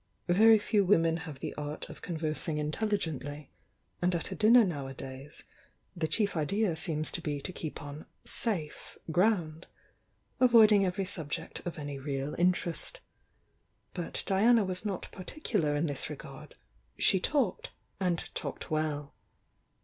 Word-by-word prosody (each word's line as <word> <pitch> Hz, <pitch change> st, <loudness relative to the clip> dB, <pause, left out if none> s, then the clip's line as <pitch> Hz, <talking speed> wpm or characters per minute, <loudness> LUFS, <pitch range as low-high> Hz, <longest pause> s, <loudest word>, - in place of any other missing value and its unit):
Very 220 Hz, +5 st, +7 dB
few 205 Hz, 0 st, +2 dB
women 165 Hz, -4 st, +3 dB
have 145 Hz, -4 st, -8 dB
the -, -, -4 dB
art 150 Hz, +1 st, -5 dB
of -, -, -11 dB
conversing 160 Hz, -1 st, -2 dB
intc 150 Hz, 0 st, -2 dB, 0.2 s
Uigently, 150 Hz, -7 st, -2 dB, 0.5 s
and 180 Hz, 0 st, +2 dB
at 170 Hz, -, -2 dB
a -, -, -3 dB
dinner 230 Hz, +3 st, +7 dB
nowadays 135 Hz, -3 st, -6 dB, 0.5 s
the 165 Hz, -3 st, -1 dB
chief 200 Hz, +6 st, +1 dB
idea 180 Hz, +4 st, +1 dB
seems 155 Hz, -2 st, -1 dB
to 175 Hz, -, -4 dB
be 145 Hz, -3 st, -2 dB
to 180 Hz, +6 st, -6 dB
keep 155 Hz, -4 st, -6 dB
on 145 Hz, +1 st, -8 dB, 0.2 s
"safe" 175 Hz, -10 st, -3 dB
ground, 175 Hz, -3 st, +1 dB, 0.7 s
avoiding 220 Hz, -5 st, +7 dB
every 185 Hz, +2 st, -1 dB
subject 160 Hz, -6 st, -5 dB
of 170 Hz, -, -4 dB
any 145 Hz, -2 st, -5 dB
real 140 Hz, +1 st, -3 dB
interest. 180 Hz, -, 0 dB, 0.9 s
But 175 Hz, -3 st, -4 dB
Diana 220 Hz, +4 st, +4 dB
was 185 Hz, 0 st, -3 dB
not 195 Hz, -3 st, -3 dB
particular 185 Hz, -, -2 dB
in 145 Hz, +3 st, +1 dB
this 145 Hz, -4 st, -3 dB
re -, -, -4 dB
gard, -, -, -11 dB, 0.2 s
— -, -, -38 dB
she 190 Hz, -, +4 dB
talked, 240 Hz, -3 st, 0 dB, 0.3 s
and 180 Hz, -3 st, 0 dB
talked -, -, -5 dB
well. 150 Hz, -2 st, -1 dB
170 Hz, 145 wpm, -31 LUFS, 150-200 Hz, 0.9 s, Very